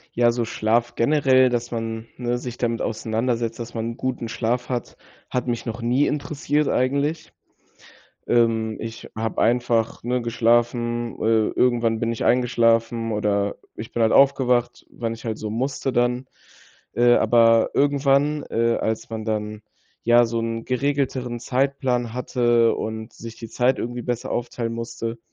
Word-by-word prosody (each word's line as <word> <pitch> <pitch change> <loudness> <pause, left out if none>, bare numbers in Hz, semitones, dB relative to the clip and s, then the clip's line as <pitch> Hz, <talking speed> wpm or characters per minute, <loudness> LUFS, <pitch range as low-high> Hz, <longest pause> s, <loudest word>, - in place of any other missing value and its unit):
Ja, 120 0 +3
also, 120 0 +2
Schlaf 115 +1 0
generell, 130 -1 +4
dass 120 0 -2
man, 115 -1 -4
ne, 120 0 -1
sich 125 -1 -6
damit 115 -1 -1
auseinandersetzt, 115 +1 -2
dass 120 0 -7
man 115 0 -2
'n 115 - -8
guten 125 -3 -3
Schlaf 125 +2 -2
hat, 125 -2 -4 0.3
hat 125 0 -1
mich 120 -1 -3
noch 115 0 -5
nie 125 +5 +2
interessiert 150 0 -1
eigentlich. 140 +5 0 1.0
Ähm, 110 -2 +2
ich 115 0 -7
habe 110 +1 -1
einfach, 115 -1 +1
ne, 125 0 0
geschlafen. 120 0 +1
Äh, 110 -1 +2
irgendwann 115 -3 +1
bin 115 0 -1
ich 115 - -4
eingeschlafen, 115 -1 +2
oder 100 -1 0 0.2
ich 110 - -8
bin 120 - 0
halt 110 - +3
aufgewacht, 125 -3 +3
wenn 115 -1 -4
ich 115 - -13
halt 110 -2 -2
so 110 -1 -5
musste 130 +3 -2
dann. 125 +1 +1 0.7
Äh, 120 0 +5
aber 115 -2 +4
irgendwann, 145 +1 +2
äh, 115 0 +1
als 110 +1 -2
man 110 -1 -5
dann, 105 -1 -3 0.4
ja, 120 +1 +6
so 115 0 -2
'n 115 0 -3
geregelteren 130 -2 -1
Zeitplan 130 -3 0
hatte 120 -2 +2
und 110 0 -5
sich 115 0 -9
die 115 - -9
Zeit 125 +3 +1
irgendwie 120 +1 -4
besser 120 -1 -3
aufteilen 120 -1 -3
musste, 115 0 -5
120 Hz, 155 wpm, -23 LUFS, 115-125 Hz, 1.0 s, ja